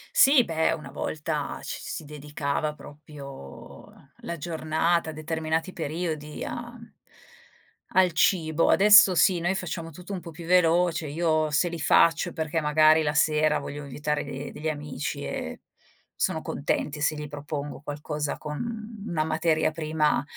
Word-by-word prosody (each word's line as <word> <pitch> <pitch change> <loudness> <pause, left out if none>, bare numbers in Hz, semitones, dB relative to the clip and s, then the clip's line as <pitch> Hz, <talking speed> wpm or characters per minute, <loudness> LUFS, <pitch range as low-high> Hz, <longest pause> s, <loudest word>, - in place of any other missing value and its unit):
Sì 270 -2 +7
beh, 160 -1 +1
una 150 - -7
volta 150 -1 -3
ci - - -5
si 160 - -6
dedicava 150 0 -3
proprio, 145 - -11
ehm, 140 - -22
la 170 - -6
giornata, 160 +1 0
determinati 160 +3 -2
periodi 155 -1 -4
a 240 +1 -6 1.2
al 185 -2 +5
cibo. 160 -1 +2
Adesso 205 -2 +7
sì, 180 +1 +4
noi 175 +3 0
facciamo 170 -3 -4
tutto 180 +5 -9
un 185 - -3
po' - - -9
più 165 +1 -10
veloce, 170 -2 +3
io 155 0 +1
se 150 +4 +2
li 170 - -6
faccio 165 +3 +4
perché 160 0 -2
magari 155 +1 +5
la 150 -1 0
sera 155 0 +3
voglio 145 +1 -6
invitare 150 +2 -2
de 140 0 -6
degli 155 +1 -4
amici 150 -2 -4
e - - -5 0.5
sono - - 0
contenti 150 0 -2
se 150 +1 +1
gli 150 0 -6
propongo 145 0 -6
qualcosa 150 0 -4
con 215 +7 -6
una 155 -3 0
materia 160 0 +1
prima 155 -2 0
155 Hz, 145 wpm, -26 LUFS, 150-170 Hz, 1.2 s, Sì